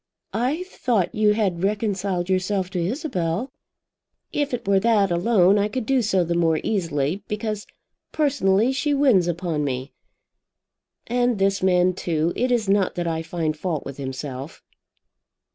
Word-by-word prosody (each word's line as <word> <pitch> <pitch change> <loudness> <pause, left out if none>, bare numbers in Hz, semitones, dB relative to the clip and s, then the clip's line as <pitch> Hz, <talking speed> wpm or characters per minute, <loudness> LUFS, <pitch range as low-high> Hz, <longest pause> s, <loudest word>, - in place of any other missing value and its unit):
"I 260 +10 0
thought 235 - -1
you 210 -1 +3
had 190 -6 0
reconciled 195 -3 -1
yourself 185 0 0
to 180 -3 -1
Isabel." 205 - -2 0.8
"If 290 -1 0
it 245 -5 -4
were 195 -1 +4
that 205 -3 +3
alone 190 +2 +4
I 205 - +2
could 235 +2 -4
do 265 0 +2
so 195 -5 +2
the 170 0 -1
more 165 -2 +2
easily, 165 -3 -1
because 210 0 -3 0.4
personally 250 -7 +2
she 285 +2 0
wins 250 -11 +4
upon 170 -3 -1
me. 130 -1 -3 1.1
And 245 -1 +1
this 195 0 +1
man, 185 -1 +3
too; 165 -2 -1
it 250 +1 0
is 235 -4 +1
not 195 -1 +2
that 175 - -2
I 160 -1 -1
find 160 -1 -2
fault 160 -2 -3
with 140 - -7
himself." 135 +1 -6
195 Hz, 150 wpm, -23 LUFS, 170-225 Hz, 1.1 s, were